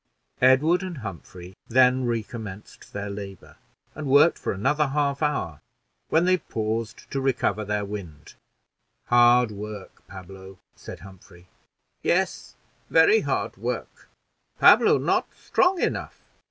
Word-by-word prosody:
Edward 145 +8 +4
and 185 -3 -6
Humphrey 95 - -9
then 130 +1 +3
recommenced 110 -3 -6
their 100 0 -5
labor, 100 -3 -9 0.4
and 155 -1 -6
worked 145 +5 +4
for - - -3
another 140 +9 0
half 140 0 -1
hour, 85 - -2 0.5
when 165 +2 +3
they 185 0 +3
paused 110 - -5
to 135 - -2
recover 120 -6 0
their 105 0 -2
wind. 90 -8 -9 0.8
"Hard 120 -1 +5
work, 105 -1 -9
Pablo," 95 0 -12 0.2
said - - -11
Humphrey. 95 -2 -16 0.5
"Yes, 185 +1 -1 0.3
very 430 +2 +5
hard - - -3
work; - - -6 0.5
Pablo - - +6
not - - 0
strong 360 0 +1
enough." - - -3
115 Hz, 120 wpm, -24 LUFS, 100-140 Hz, 0.8 s, Pablo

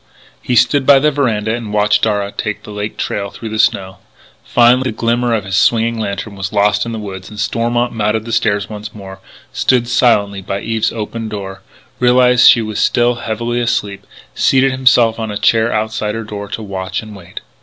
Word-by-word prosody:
He 125 - -1
stood 130 +3 +3
by 140 -1 +8
the 150 +3 +2
veranda 110 -7 0
and 115 -3 -5
watched 105 0 +2
Darragh 105 -2 -1
take 105 -1 -4
the - - -10
Lake 105 +1 -5
Trail 100 0 -3
through 110 +2 -8
the 110 0 -4
snow. 95 -3 +1 0.5
Finally 125 +2 +3
the 110 - -8
glimmer 120 0 +1
of 105 - -2
his 95 -1 -3
swinging 115 +2 +2
lantern 100 0 -4
was 95 0 -5
lost 105 +1 +1
in - - -4
the 115 - -4
woods 95 -3 -8
and 105 - -10
Stormont 120 +2 -1
mounted 110 0 -1
the 115 - -6
stairs 105 -3 0
once 105 0 -8
more, 95 -2 -10 0.3
stood 125 -2 +1
silently 115 -5 +2
by 100 +1 -4
Eve's 115 -1 -1
open 115 0 -5
door, 95 -2 -7 0.4
realised 125 0 +5
she 115 - +4
was 110 -1 -4
still 120 0 +2
heavily 120 +1 -3
asleep, 105 -4 -2
and - - -20
seated 135 0 +4
himself 125 -3 +3
on 110 -1 -3
a 105 - -3
chair 115 +2 +2
outside 110 0 -2
her 115 - -4
door 105 -1 -7
to 110 - -6
watch 95 0 -4
and 110 -1 -11
wait. 90 -4 -10
110 Hz, 200 wpm, -16 LUFS, 105-120 Hz, 0.5 s, by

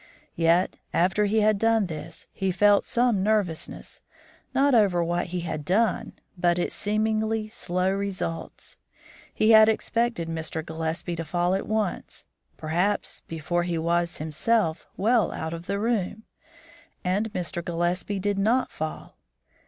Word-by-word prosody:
Yet 170 +2 +2 0.2
after 190 +4 +3
he 215 +2 +2
had 210 -1 +3
done 225 -1 +3
this, 155 -4 -7
he 190 -1 -1
felt 205 +2 +4
some 240 -5 +2
nervousness, 200 -6 -1 0.5
not 280 +1 +3
over 195 -7 +4
what 175 +1 -1
he 180 0 -3
had 160 -3 -4
done, 210 +8 +1 0.2
but 175 -1 +2
its 175 - -1
seemingly 215 +1 0
slow 185 -4 -1
results. 190 -4 -4 0.5
He 215 - +3
had 220 0 +8
expected 230 -4 0
Mr. 160 -1 -4
Gillespie 160 +2 -3
to 165 - -2
fall 175 +3 0
at 195 - -1
once, 215 -3 -2 0.3
perhaps 175 +6 -1
before 165 +2 -1
he 175 -1 -1
was, 170 +1 0
himself, 160 +3 0
well 225 +2 +3
out 160 +1 -4
of 170 +1 -7
the 200 - -1
room, 220 -1 -1 0.8
and 200 +4 0
Mr. 175 -3 -3
Gillespie 175 +3 -1
did 200 +1 -1
not 230 +6 +2
fall. 155 0 -6
185 Hz, 140 wpm, -26 LUFS, 170-215 Hz, 0.8 s, had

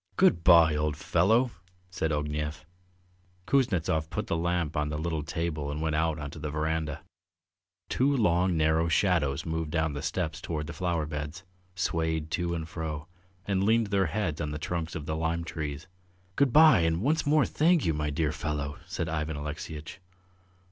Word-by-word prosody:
"Good 85 - +4
bye, 85 -3 +7
old 75 -1 -1
fellow!" 110 +10 +2 0.4
said 85 -3 -1
Ognev. 75 +1 -3 0.8
Kuznetsov 85 - +1
put - - -3
the - - -1
lamp 85 -2 -1
on 75 0 0
a - - -2
little 80 0 -2
table 75 -1 -3
and 75 +1 -3
went 80 -1 0
out 75 -2 -1
to 80 - -9
the 75 - -4
verandah. 80 0 -2 0.9
Two 140 +2 +2
long 90 -5 +2
narrow 80 +1 +2
shadows 80 -5 +1
moved 80 -1 -2
down 80 -1 0
the 70 - -4
steps 80 -1 -2
towards 75 -2 -3
the 85 - -7
flower 85 -1 -1
beds, 75 +3 -5 0.3
swayed 80 -3 -1
to 85 0 -1
and 80 -1 -4
fro, 80 -2 -5 0.4
and 95 -1 0
leaned 110 0 +2
their 95 -3 +2
heads 85 -5 -2
on 75 - -2
the 75 - -4
trunks 85 +1 -3
of 75 - -5
the 80 - -2
lime 80 +1 -1
trees. 75 -1 -5 0.5
"Good 140 -3 +3
bye 155 - +7
and 80 +2 +1
once 155 +3 +1
more 150 0 +4
thank 165 0 +2
you, 80 - +2
my 75 0 -1
dear 75 +1 0
fellow!" 75 -2 -3
said 85 - -3
Ivan 80 -1 -2
Alexeyitch. 75 +3 -6
80 Hz, 175 wpm, -28 LUFS, 75-85 Hz, 0.9 s, bye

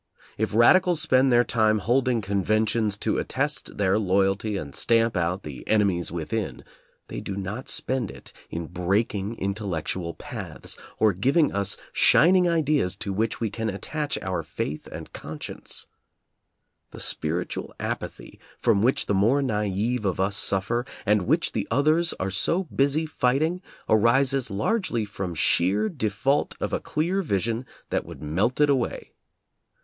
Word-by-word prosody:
If 110 0 -2
radicals 175 +9 +5
spend 130 -4 +3
their 120 0 +5
time 110 -3 +2
holding 120 +2 +1
conventions 105 +2 +1
to - - 0
attest - - -2
their 100 0 +2
loyalty 100 +1 +1
and 70 -6 -6
stamp 115 -1 +2
out 90 +2 -1
the 70 -4 -8
"enemies 100 -5 +2
within," 85 - -3 0.4
they - - -6
do 100 - -5
not 100 +6 -5
spend 130 -6 -1
it - - -12 0.2
in 85 0 -4
breaking 100 +5 -1
intellec 100 -5 -3
tual 85 -3 -4
paths, - - -7 0.2
or 110 -2 +4
giving 140 - +2
us 100 -1 0 0.2
shining 180 +2 +5
ideas 150 - +1
to 100 0 -4
which 110 +3 -1
we 115 -3 -1
can 110 +1 -2
attach 145 +10 -3
our 95 -2 -1
faith 75 0 -5
and - - -9
conscience. 75 0 -6 1.0
The - - -11
spir 85 +3 -2
itual - - -5
apathy - - -5 0.2
from 110 -4 +2
which 125 +4 +2
the - - 0
more 115 +9 +3
naive 105 0 -1
of 95 -3 -1
us 95 +1 +1
suf 95 -1 0
fer, 120 +3 0 0.2
and 105 -2 +2
which 160 +5 +2
the 105 - -2
others 155 +7 +2
are 95 +1 -3
so 165 - +1
busy 145 -1 +1
fighting, 155 +5 +1 0.3
arises 130 +4 +3
largely 120 - 0
from 95 -4 -5
sheer 95 +7 +2
default 135 - 0
of - - -3
a - - +1
clear 175 +6 -1
vision 115 - -1 0.2
that - - 0
would - - -10
melt 95 - 0
it 150 - +5
away. 130 -4 -1
110 Hz, 155 wpm, -25 LUFS, 95-130 Hz, 1.0 s, radicals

